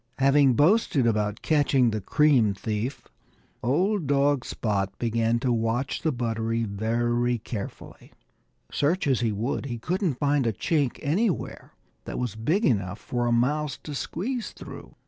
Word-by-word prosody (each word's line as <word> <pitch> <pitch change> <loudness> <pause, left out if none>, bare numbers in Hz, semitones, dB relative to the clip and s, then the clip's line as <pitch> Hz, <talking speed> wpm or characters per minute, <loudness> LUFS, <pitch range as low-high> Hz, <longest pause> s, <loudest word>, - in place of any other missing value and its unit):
Having 135 0 +4
boasted 150 - +3
about 105 -2 0
catching 140 -5 +3
the 110 -1 -3
cream 125 -3 +3
thief, 110 +6 -4 0.5
old 170 - +1
dog 140 -1 +2
Spot 100 -3 -2
began 115 0 +1
to 125 -2 +1
watch 115 +3 -1
the 160 - +1
buttery 115 -2 -1
very 120 +3 0
carefully. 105 -2 -8 0.6
Search 160 +6 +1
as 135 -4 +2
he 115 -2 0
would, 115 +7 -2
he 120 -3 -4
couldn't 175 - -1
find 145 -3 +1
a 115 - +1
chink 145 - 0
anywhere 180 +7 -1 0.3
that - - -5
was 125 -5 -2
big 160 - 0
enough 100 -5 0
even - - -25
for 120 - +1
a - - +1
mouse 140 +4 +1
to 150 - -6
squeeze 225 - -3
through. - - -11
125 Hz, 150 wpm, -26 LUFS, 115-145 Hz, 0.6 s, Having